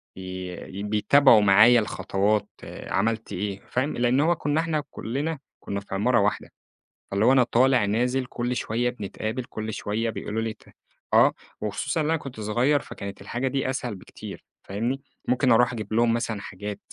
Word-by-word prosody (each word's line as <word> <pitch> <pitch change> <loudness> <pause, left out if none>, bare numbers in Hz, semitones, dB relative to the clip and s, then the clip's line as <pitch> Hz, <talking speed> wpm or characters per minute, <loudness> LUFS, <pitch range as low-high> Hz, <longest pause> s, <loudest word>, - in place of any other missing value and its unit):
ي 95 +1 -7
بيتابعوا 110 +3 +5
معايا 105 +5 +7
الخطوات، 105 -1 0 0.4
عملت 110 +1 -1
إيه 100 +1 -3
فاهم؟ 130 +4 -1
لأن 120 +2 +2
هو 165 +4 +3
كنا 150 0 0
إحنا 160 -2 -1
كلنا 145 +6 -3 0.2
كنا 100 - -4
في 100 -1 -7
عمارة 120 +5 +3
واحدة، 100 0 0 0.6
فاللي 100 +2 +2
هو - - +6
أنا 130 -1 +6
طالع 125 -1 +3
نازل 125 +5 0
كل 125 0 -3
شوية 120 +2 0
بنتقابل، 110 +1 -4
كل 110 -3 -6
شوية 110 +3 -2
بيقولوا 110 0 -3
لي 115 -1 -2
ت - - -24 0.5
آه، - - +6 0.3
وخصوصًا 105 - -1
إن - - -1
أنا 165 +2 +2
كنت 135 -7 -9
صغير 120 +7 +2
فكانت 100 -7 -8
الحاجة 120 +6 -2
دي 135 0 -1
أسهل 125 -4 -3
بكتير 95 - -10 0.2
فاهمني، 120 +7 -2 0.3
ممكن 125 0 +3
أروح 120 +2 +4
أجيب 110 -2 -5
لهم 115 +1 +3
مثلًا 115 -3 -2
حاجات 105 +1 -6
115 Hz, 165 wpm, -25 LUFS, 105-130 Hz, 0.6 s, معايا